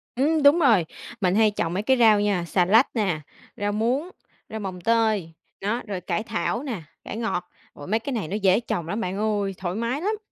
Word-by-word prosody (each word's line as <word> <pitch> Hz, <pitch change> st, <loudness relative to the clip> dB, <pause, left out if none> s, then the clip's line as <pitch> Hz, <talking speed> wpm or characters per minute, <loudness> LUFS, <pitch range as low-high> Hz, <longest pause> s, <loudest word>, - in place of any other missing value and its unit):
Ừm, 300 Hz, +4 st, +2 dB
đúng 285 Hz, +4 st, +7 dB
rồi. 225 Hz, -, +4 dB, 0.4 s
Mình 185 Hz, -1 st, +2 dB
hay 215 Hz, 0 st, +4 dB
trồng 170 Hz, -5 st, -2 dB
mấy 195 Hz, +3 st, -1 dB
cái 260 Hz, +3 st, +3 dB
rau 220 Hz, -3 st, +6 dB
nha, 200 Hz, -4 st, 0 dB
xà 180 Hz, +2 st, +2 dB
lách 225 Hz, +9 st, +4 dB
nè, 190 Hz, -9 st, 0 dB, 0.4 s
rau 205 Hz, 0 st, -1 dB
muống, 245 Hz, -, 0 dB, 0.4 s
rau 220 Hz, -, -5 dB
mồng 185 Hz, -3 st, -6 dB
tơi, 220 Hz, -6 st, +1 dB, 0.3 s
đó, 230 Hz, +5 st, -1 dB
rồi 195 Hz, -3 st, -4 dB
cải 180 Hz, +3 st, -2 dB
thảo 230 Hz, +2 st, -2 dB
nè, 240 Hz, -, -4 dB, 0.2 s
cải -, -, -6 dB
ngọt. 180 Hz, -6 st, -2 dB, 0.2 s
Ôi, 145 Hz, -, -10 dB
mấy 220 Hz, +3 st, +1 dB
cái 265 Hz, +4 st, -5 dB
này 215 Hz, -9 st, -2 dB
nó 190 Hz, -, -3 dB
dễ 195 Hz, -1 st, +3 dB
trồng 175 Hz, -8 st, -3 dB
lắm 205 Hz, +6 st, -2 dB
bạn 185 Hz, 0 st, -3 dB
ơi, 205 Hz, -2 st, 0 dB
thoải 180 Hz, -1 st, -3 dB
mái 235 Hz, +6 st, -2 dB
lắm. 425 Hz, +4 st, -1 dB
210 Hz, 220 wpm, -24 LUFS, 185-230 Hz, 0.4 s, đúng